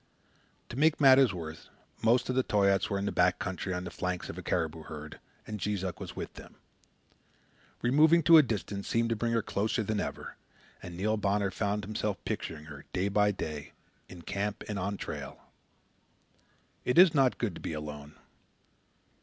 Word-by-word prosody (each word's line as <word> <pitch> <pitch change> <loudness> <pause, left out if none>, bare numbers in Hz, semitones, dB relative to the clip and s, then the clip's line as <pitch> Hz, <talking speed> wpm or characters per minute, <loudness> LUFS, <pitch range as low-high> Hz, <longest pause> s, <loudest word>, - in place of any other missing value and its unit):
To - - -7
make 155 +2 +3
matters 135 -4 +7
worse, 80 -3 -8 0.3
most 115 +3 +3
of 130 - 0
the 130 - +3
Toyaats 100 -4 +2
were 100 - 0
in 100 - -2
the - - -1
back 90 0 +3
country 95 0 -4
on 90 0 -2
the 90 - -6
flanks 90 0 -3
of - - -12
a - - -6
caribou 80 -2 -1
herd, 75 -1 -9 0.3
and 105 -1 -6
Jees 100 0 -2
Uck 95 -2 -4
was - - -7
with - - -6
them. - - -13 1.3
Removing 155 +7 +5
to 165 +1 +9
a - - +9
distance 105 -5 -4
seemed 115 0 +1
to 115 - +1
bring 115 +2 -1
her 115 -2 +1
closer 110 +3 -1
than 105 0 -1
ever, - - -5 0.4
and 85 -1 -8
Neil 110 +4 0
Bonner 100 -1 0
found 105 0 -1
himself 105 -1 -2
picturing 75 -2 -4
her, 70 -3 -11
day 95 +2 0
by 105 +1 +3
day, 75 -7 -5 0.4
in 85 -2 -11
camp 100 +3 -3
and 105 -2 -3
on 100 +2 -2
trail. - - -6 1.4
It 125 - 0
is 180 -2 +8
not 135 -4 +3
good 110 -6 -1
to - - -10
be - - -4
alone. 75 -1 -7
100 Hz, 185 wpm, -30 LUFS, 90-115 Hz, 1.4 s, to